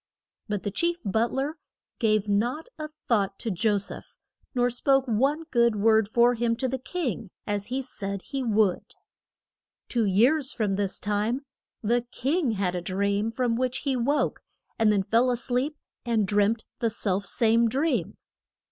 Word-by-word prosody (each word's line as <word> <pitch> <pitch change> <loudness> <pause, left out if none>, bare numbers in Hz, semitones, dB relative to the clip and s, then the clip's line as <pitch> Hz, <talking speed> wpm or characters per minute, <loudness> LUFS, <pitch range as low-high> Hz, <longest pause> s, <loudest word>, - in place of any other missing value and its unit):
But 205 -3 -2
the 205 - -2
chief 340 - +1
but 220 +4 +1
ler 285 +4 -2 0.4
gave 215 -3 +2
not 240 - 0
a 305 - -3
thought 220 -10 -1
to 230 - -3
Jo 205 +3 +2
seph, 200 - -8 0.4
nor 245 0 +2
spoke 270 +2 +2
one 270 +7 +1
good 235 -2 +3
word 220 0 +4
for 240 +2 +4
him 235 -1 0
to 260 +2 -1
the 260 +1 -2
king, 255 - -3 0.2
as 205 -1 -2
he 250 - -3
had 270 -1 -2
said 200 -5 -4
he 275 - -4
would. 215 -6 +1 0.9
Two 235 -3 +1
years 255 +9 +3
from 210 -4 -1
this 195 -1 -1
time 215 +6 -1 0.4
the 240 +3 +2
king 280 -1 0
had 190 -3 -1
a 180 - -2
dream, 200 +4 0
from 235 0 0
which 255 +1 -1
he 275 -3 0
woke, 275 +5 0 0.4
and 220 -1 +5
then 200 -2 +2
fell 230 +6 +3
a 245 - +1
sleep 260 +5 -1 0.3
and 225 -4 +1
dreamt 210 +2 +2
the 230 - +1
self 200 -3 0
same 230 -1 +3
dream. 285 +7 0
230 Hz, 170 wpm, -26 LUFS, 205-260 Hz, 0.9 s, and